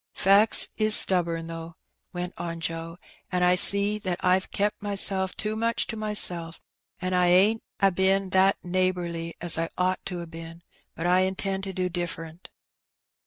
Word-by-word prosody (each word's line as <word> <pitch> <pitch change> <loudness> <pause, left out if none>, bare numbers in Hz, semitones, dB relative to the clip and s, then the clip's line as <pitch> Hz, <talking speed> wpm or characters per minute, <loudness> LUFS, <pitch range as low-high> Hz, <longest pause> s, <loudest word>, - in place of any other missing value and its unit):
"Facts 200 +3 +4
is 215 -1 +5
stubborn, 170 -3 +2
though," 165 0 -9 0.4
went 180 -1 -6
on 170 -1 -5
Joe, 165 +1 -5 0.3
'^an' 180 -1 0
I 180 0 +4
see 200 +3 +5
that 185 -3 -3
I've 185 +1 +1
kep' 205 +1 -1
mysel' 195 -2 +2
too 210 +3 -4
much 230 +1 -1
to 225 - -6
mysel', 180 -6 -1 0.4
an' 185 0 -3
I 180 -1 +2
ain't 195 +5 +4 0.2
a 195 -1 +3
been 190 +1 0
that 190 +1 +3
neighbourly 175 -2 -2
as 170 -1 0
I 165 0 -2
ought 185 +1 -1
to 180 -2 -5
ha' - - -16
been; 165 +1 -11 0.3
but 165 - -5
I 180 +1 +3
intend 190 +1 -2
to 190 - -6
do 185 0 -2
differ'nt." 170 -1 -6
185 Hz, 165 wpm, -25 LUFS, 170-195 Hz, 0.4 s, is